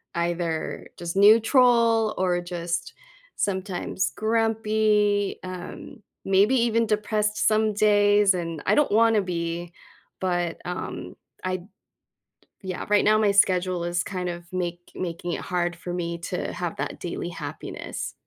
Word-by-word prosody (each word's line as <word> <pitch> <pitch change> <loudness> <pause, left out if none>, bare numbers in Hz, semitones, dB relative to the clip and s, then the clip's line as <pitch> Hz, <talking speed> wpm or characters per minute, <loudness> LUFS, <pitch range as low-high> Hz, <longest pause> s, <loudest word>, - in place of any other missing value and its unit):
either 170 -1 -2
just 170 0 -5
neutral 225 +1 +5
or 180 -1 +1
just 175 -1 -4 0.4
sometimes 190 -1 -2
grumpy, 215 -2 +1
um, 185 +7 -8 0.2
maybe 200 +6 +4
even 230 -1 +2
depressed 210 0 0
some 215 0 +2
days, 205 -1 +4
and 165 -3 -4
I - - +3
don't 295 - +3
want 225 +1 +4
to - - +4
be 170 -1 -4 0.5
but, 175 -2 -1
um, 180 +1 -5 0.3
I 185 0 -1
d 175 - -14 1.0
yeah, 185 -1 -4
right 210 0 +4
now 215 +1 +5
my 210 -2 +3
schedule 185 -3 +2
is 175 +1 0
kind 180 -2 -3
of 175 0 -6
make 175 -1 -4
making 175 -1 -4
it - - -3
hard 175 -1 -1
for 175 +1 -7
me 170 -1 -3
to 170 - -4
have - - -4
that - - -4
daily - - -4
happiness. - - -6
190 Hz, 140 wpm, -25 LUFS, 175-215 Hz, 1.0 s, neutral